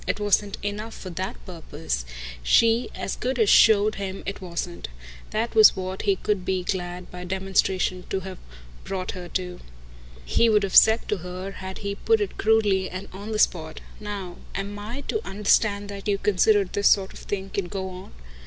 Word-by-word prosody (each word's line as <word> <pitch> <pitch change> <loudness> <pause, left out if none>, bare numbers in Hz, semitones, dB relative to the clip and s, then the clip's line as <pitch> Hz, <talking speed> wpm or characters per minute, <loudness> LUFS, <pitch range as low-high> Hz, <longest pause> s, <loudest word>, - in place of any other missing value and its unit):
It - - -1
wasn't 205 0 +1
enough 210 +2 -4
for 185 - -8
that 185 +3 -4
purpose 160 - -5 0.4
she 230 - +4
as - - -3
good 255 +1 -2
as 220 -4 +4
showed 215 -1 +6
him 195 0 -5
it 200 - -5
wasn't. 175 -1 -5 0.4
That 225 +2 -2
was 220 -2 +8
what 185 0 -4
he 200 -2 +2
could 200 0 -1
be 185 0 -1
glad, 180 -1 -4
by 180 0 -7
demonstration, 185 0 0
to 190 - -1
have 190 -1 -8 0.4
brought 185 -1 -3
her 180 -2 -8
to. 180 0 -4 0.7
He 230 - +3
would 210 -2 +4
have 195 - -2
said 220 +1 +7
to 210 - +1
her 180 +2 -6
had 190 -1 -7
he 200 - -1
put 445 - +2
it 410 - -3
crudely 210 -4 +3
and 185 +2 -7
on 200 +3 -7
the 215 - -1
spot: 160 -6 +1 0.2
"NOW 200 -4 -6 0.2
am 200 +1 -4
I 230 +7 -6
to 435 +8 -3
understand 205 0 +2
you - - -9
that 195 - -9
you 200 -1 +2
consider 205 +1 +3
this 200 +2 +2
sort 195 -1 +2
of - - -11
thing 195 -1 -5
can 195 -3 -2
go 190 +1 -4
on?" 185 +1 -10
195 Hz, 190 wpm, -25 LUFS, 185-210 Hz, 0.7 s, was